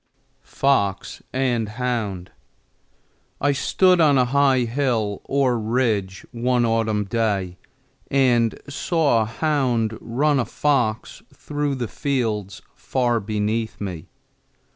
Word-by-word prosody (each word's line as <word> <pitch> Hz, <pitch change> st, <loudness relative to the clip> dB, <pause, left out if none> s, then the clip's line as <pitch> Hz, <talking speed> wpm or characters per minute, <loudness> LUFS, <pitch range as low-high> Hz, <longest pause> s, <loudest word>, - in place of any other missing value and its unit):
FOX 100 Hz, -9 st, +1 dB
AND 120 Hz, -4 st, 0 dB
HOUND. 110 Hz, -8 st, -3 dB, 1.1 s
I 145 Hz, -, +2 dB
STOOD 180 Hz, +5 st, +3 dB
on 145 Hz, -3 st, +5 dB
a 125 Hz, -, +4 dB
high 135 Hz, 0 st, +3 dB
hill 115 Hz, -4 st, -1 dB
or 130 Hz, -4 st, +1 dB
ridge 110 Hz, -4 st, -1 dB
one 120 Hz, 0 st, +1 dB
autumn 110 Hz, -2 st, +1 dB
day 100 Hz, -5 st, -1 dB, 0.5 s
and 120 Hz, -4 st, +2 dB
saw 145 Hz, -4 st, +1 dB
a -, -, 0 dB
hound 120 Hz, -3 st, 0 dB
run 140 Hz, +4 st, +1 dB
a 120 Hz, -, 0 dB
fox 125 Hz, -7 st, -1 dB
through 145 Hz, -1 st, -3 dB
the 125 Hz, -3 st, -3 dB
fields 110 Hz, -7 st, -2 dB
far 120 Hz, -3 st, 0 dB
beneath 110 Hz, +2 st, -2 dB
me. 90 Hz, -6 st, -6 dB
120 Hz, 110 wpm, -22 LUFS, 110-135 Hz, 1.1 s, on